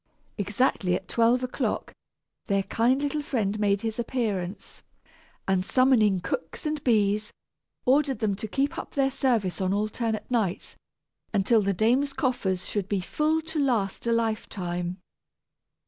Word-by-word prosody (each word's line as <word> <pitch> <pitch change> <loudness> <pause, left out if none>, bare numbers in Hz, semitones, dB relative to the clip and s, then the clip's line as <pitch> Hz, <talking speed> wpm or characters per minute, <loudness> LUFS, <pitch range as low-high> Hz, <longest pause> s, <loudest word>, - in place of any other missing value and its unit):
Exactly 200 -2 +1
at 190 - -5
twelve 235 +4 +3
o'clock, 255 - -2 0.5
their 195 -1 +2
kind 250 +7 +1
little 290 +1 -1
friend 215 -7 -1
made 200 -1 +2
his 225 0 -3
appearance, 215 -6 -3 0.7
and 190 -1 +2
summoning 220 -6 +3
cooks 165 - -4
and 305 -1 -2
bees, 210 -2 +2 0.5
ordered 270 0 +3
them 210 -2 0
to 220 - -5
keep 275 +6 -1
up - - -8
their 270 -1 +2
service 230 -9 0
on 185 0 +1
alternate 215 +1 -1
nights, 215 -7 -1 0.6
until 210 +3 +4
the 200 0 +1
dame's 245 +8 +2
coffers 195 - -1
should 200 -2 -2
be 200 - +1
full 310 - 0
to 320 -1 -4
last 235 -7 0
a - - +2
lifetime. 185 -6 -2
220 Hz, 140 wpm, -27 LUFS, 195-255 Hz, 0.7 s, until